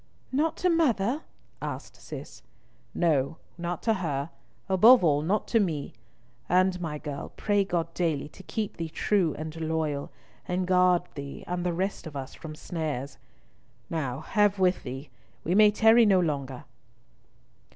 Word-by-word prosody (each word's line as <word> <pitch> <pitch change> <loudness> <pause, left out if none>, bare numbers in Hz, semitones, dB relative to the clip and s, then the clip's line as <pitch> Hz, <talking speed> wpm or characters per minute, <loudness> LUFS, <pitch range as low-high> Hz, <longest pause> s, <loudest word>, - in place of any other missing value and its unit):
"Not 300 +5 +1
to 365 - +2
mother?" 270 -5 +2 0.4
asked - - -6
Cis. - - -9 0.5
"No, 160 -3 +1 0.2
not 175 0 -4
to 225 - +3
her, 155 -6 -2 0.4
above 215 +5 +7
all 145 -3 +3
not 190 +7 0
to 230 - +4
me, 160 -8 -1 0.6
and, 185 0 +3
my 155 -3 -3
girl, 145 -2 -6
pray 205 -1 +2
God 170 -3 -2
daily 160 -6 -1
to 190 - -14
keep 195 +5 -4
thee 165 -2 -3
true 180 -2 +1
and 155 +1 -6
loyal, 160 -3 -2 0.4
and 180 +1 0
guard 180 -1 +4
thee 140 -1 -7
and 180 0 -3
the 180 - 0
rest 185 +1 -2
of 150 - -9
us 135 -1 -5
from 155 -2 -9
snares. 150 -5 -4 0.7
Now 140 -4 -2
have 205 +4 +2
with 185 -1 +2
thee. 135 +3 -7 0.3
We 170 - 0
may 210 +2 +7
tarry 225 +2 +5
no 195 -2 +5
longer!" 140 -6 -2
175 Hz, 150 wpm, -27 LUFS, 150-195 Hz, 0.7 s, above